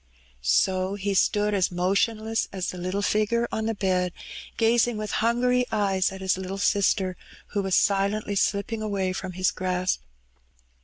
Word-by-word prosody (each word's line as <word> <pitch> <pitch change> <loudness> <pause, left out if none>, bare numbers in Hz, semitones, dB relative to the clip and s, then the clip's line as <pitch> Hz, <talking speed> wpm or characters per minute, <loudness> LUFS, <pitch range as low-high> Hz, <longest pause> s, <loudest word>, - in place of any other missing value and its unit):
So 185 - +2
he 200 0 -2
stood 210 +2 +2
as 190 -3 +2
motionless 215 +5 0
as 190 -2 -3
the 180 - -8
little 185 +3 -2
Sgore 215 +3 +1
on 220 0 -2
the 225 - -1
bed, 185 -2 0 0.4
gazing 235 0 +3
with 215 -1 -4
hangiy 250 +2 +2
eyes 195 -3 +1
at 190 0 -8
his 190 0 0
little 190 +1 -5
sister, 195 -2 +1 0.3
who 205 - -1
was 190 -2 0
silently 200 +1 +1
slipping 200 +2 0
away 195 -3 -1
from 185 -1 -5
hia 185 +1 -3
grasp. 185 - -1
200 Hz, 155 wpm, -25 LUFS, 185-215 Hz, 0.4 s, gazing